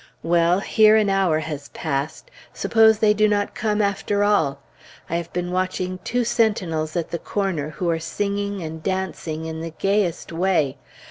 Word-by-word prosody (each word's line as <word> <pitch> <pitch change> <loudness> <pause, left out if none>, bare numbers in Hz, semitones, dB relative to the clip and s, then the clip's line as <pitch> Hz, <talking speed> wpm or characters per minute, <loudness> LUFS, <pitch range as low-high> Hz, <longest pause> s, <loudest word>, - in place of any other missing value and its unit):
Well! 170 +2 +3
here 215 0 +5
an 210 -2 +3
hour 190 -5 +2
has 150 -3 -6
passed; 155 - -4 0.2
suppose 220 -1 +4
they 210 -1 +4
do 215 0 +3
not 205 -1 0
come 210 -1 0
after 200 0 0
all? 160 -10 +2 0.5
I 170 - +1
have 170 -1 -5
been 180 0 -3
watching 185 0 -2
two 245 +1 0
sentinels 190 -10 0
at 170 -2 -2
the 170 - -2
corner, 185 -8 -2
who 175 +3 -4
are 165 - -1
singing 200 +3 -3
and 160 0 -6
dancing 170 -3 -3
in 160 0 -5
the 165 - -4
gayest 195 -4 0
way. 165 -5 +1
185 Hz, 170 wpm, -22 LUFS, 160-205 Hz, 0.5 s, here